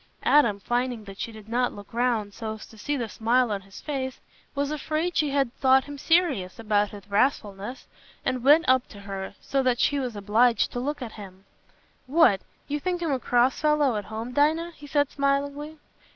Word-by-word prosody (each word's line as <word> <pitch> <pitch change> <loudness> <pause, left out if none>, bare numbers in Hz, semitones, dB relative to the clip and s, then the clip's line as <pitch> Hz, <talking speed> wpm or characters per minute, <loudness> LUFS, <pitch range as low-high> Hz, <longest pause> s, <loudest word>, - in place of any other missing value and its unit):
Adam, 235 -9 +4
finding 240 +1 -1
that 195 -1 -11
she 230 - -4
did 215 -1 -12
not 245 +2 0
look 205 +1 -12
round 230 -4 0
so 220 0 -5
as 215 - -10
to - - -16
see 285 +7 -2
the 235 -3 -2
smile 235 +2 +1
on 200 -1 -2
his 195 0 -13
face, 265 -3 -4 0.4
was 285 +1 -1
afraid 310 +3 -2
she 300 - +2
had 275 -3 0
thought 265 0 +5
him 290 +1 -8
serious 285 - +1
about 210 -2 +1
his 205 -1 -11
wrathfulness, 205 0 -1 0.4
and 255 -2 -1
went 300 +5 +6
up 260 -1 +4
to 200 - -12
her, 195 0 -6
so 275 - 0
that 255 -2 +1
she 285 - +2
was 250 -4 -3
obliged 220 +4 +2
to 245 - -3
look 285 +2 -3
at 230 - -6
him. 195 -2 -12 0.6
"What! 260 - +4 0.3
You 295 +1 -2
think 355 +2 -2
I'm 325 - 0
a 265 - 0
cross 245 +1 +2
fellow 300 -5 +3
at 205 -2 -3
home, 225 +3 -6
Dinah?" 315 +5 +2
he 290 - -12
said, 290 0 +1
smilingly. 285 +2 -1
250 Hz, 200 wpm, -26 LUFS, 215-285 Hz, 0.6 s, went